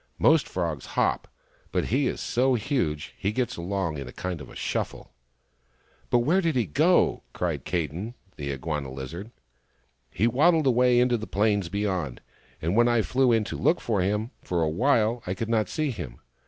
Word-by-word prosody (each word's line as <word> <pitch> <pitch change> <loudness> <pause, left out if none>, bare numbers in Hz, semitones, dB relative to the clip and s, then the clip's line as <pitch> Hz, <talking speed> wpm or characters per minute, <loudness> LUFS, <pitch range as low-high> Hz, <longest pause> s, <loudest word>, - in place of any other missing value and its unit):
Most - - +4
frogs - - -3
hop, - - +1 0.4
but - - 0
he 135 -1 +3
is - - -2
so 130 +1 +2
huge 105 - -1
that - - -24
he 100 - 0
gets 125 +2 -1
along 85 -3 -2
in 70 - -6
a - - -8
kind 90 0 -4
of 65 - -10
shuffle." - - -3 0.5
" 60 0 -37
But 120 -1 +3
where 185 +6 +3
did 165 -5 0
he 120 -3 +2
go? 75 - +3
" - - -41
cried - - -2
Kadin, 90 - -3 0.2
the 70 -2 -5
Inguana 70 0 -3
lizard. 75 - -7 0.5
" - - -41 0.3
He 105 - 0
waddled 155 +6 +4
away 125 -1 +4
into 125 -1 +3
the 110 - -6
plains 100 -3 +1
beyond, 95 -9 -2 0.4
and 85 +5 0
when 120 +1 +5
I 120 -2 +3
flew 130 +1 +2
in 115 -2 +3
to - - -5
look 170 - +2
for 105 -5 0
him, 105 +5 0
for 85 -2 -1
awhile 115 - +2
I 90 - -1
could 110 +3 -4
not 110 -2 +1
find 155 -4 -1
him. 70 - -7
105 Hz, 195 wpm, -26 LUFS, 85-125 Hz, 0.5 s, when